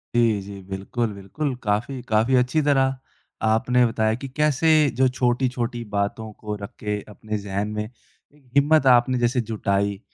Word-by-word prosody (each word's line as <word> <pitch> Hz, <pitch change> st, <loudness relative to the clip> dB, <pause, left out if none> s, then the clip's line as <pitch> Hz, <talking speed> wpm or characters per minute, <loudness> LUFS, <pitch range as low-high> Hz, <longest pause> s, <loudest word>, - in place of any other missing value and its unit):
जी, 115 Hz, -4 st, +3 dB
जी। 100 Hz, 0 st, -9 dB
बिल्कुल, 105 Hz, +4 st, -3 dB
बिल्कुल, 100 Hz, +9 st, -4 dB
काफ़ी 115 Hz, +5 st, -1 dB
काफ़ी 110 Hz, +4 st, +2 dB
अच्छी 125 Hz, +5 st, +2 dB
तरह 135 Hz, -2 st, +2 dB, 0.5 s
आपने 125 Hz, +3 st, +3 dB
बताया 110 Hz, -1 st, +1 dB
कि -, -, -3 dB
कैसे 150 Hz, +1 st, +3 dB, 0.2 s
जो 130 Hz, +1 st, +4 dB
छोटी-छोटी 125 Hz, -1 st, -1 dB
बातों 105 Hz, +2 st, -2 dB
को 105 Hz, -1 st, -4 dB
रख 100 Hz, -, -7 dB
के 105 Hz, -1 st, -2 dB
अपने 110 Hz, +1 st, -5 dB
ज़हन 100 Hz, 0 st, -3 dB
में 105 Hz, -, -1 dB
एक 130 Hz, +3 st, -22 dB
हिम्मत 145 Hz, 0 st, +4 dB
आपने 125 Hz, 0 st, +5 dB
जैसे 120 Hz, +1 st, +1 dB
जुटाई 100 Hz, -2 st, 0 dB
120 Hz, 155 wpm, -23 LUFS, 105-130 Hz, 0.5 s, आपने